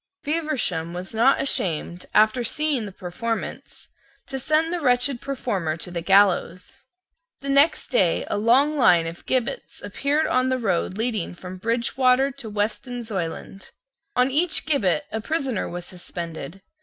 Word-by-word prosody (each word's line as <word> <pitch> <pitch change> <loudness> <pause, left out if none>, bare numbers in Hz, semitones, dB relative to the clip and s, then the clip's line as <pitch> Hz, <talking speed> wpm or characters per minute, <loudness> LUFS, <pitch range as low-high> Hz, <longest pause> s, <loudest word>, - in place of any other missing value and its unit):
Feversham 270 - -1
was 180 +3 -7
not 235 +5 +4
ashamed, 175 - -1
after 215 +3 +4
seeing 280 -2 -1
the - - -8
performance, 190 +6 -5 0.4
to 270 - -5
send 310 +5 +1
the 350 - -2
wretched 250 -1 +2
performer 195 - -2
to 175 - -4
the 170 -1 -3
gallows. 195 +5 +2 0.5
The 275 - -5
next 280 +4 +4
day 190 -10 +2
a - - -2
long 255 +8 +3
line 175 -9 +5
of 165 +1 -8
gibbets 260 - -2
appeared 295 +3 0
on 255 0 +1
the 260 - +1
road 195 -4 -1
leading 220 -6 -2
from 185 +1 -9
Bridgewater 250 +4 +2
to 260 -4 -9
Weston 225 +4 -3
Zoyland. 195 -2 -5 0.5
On 250 +2 +3
each 320 +4 +1
gibbet 200 - +1
a 220 - -3
prisoner 270 -5 -2
was 175 0 -6
suspended. 175 -1 -7
230 Hz, 145 wpm, -24 LUFS, 185-270 Hz, 0.5 s, line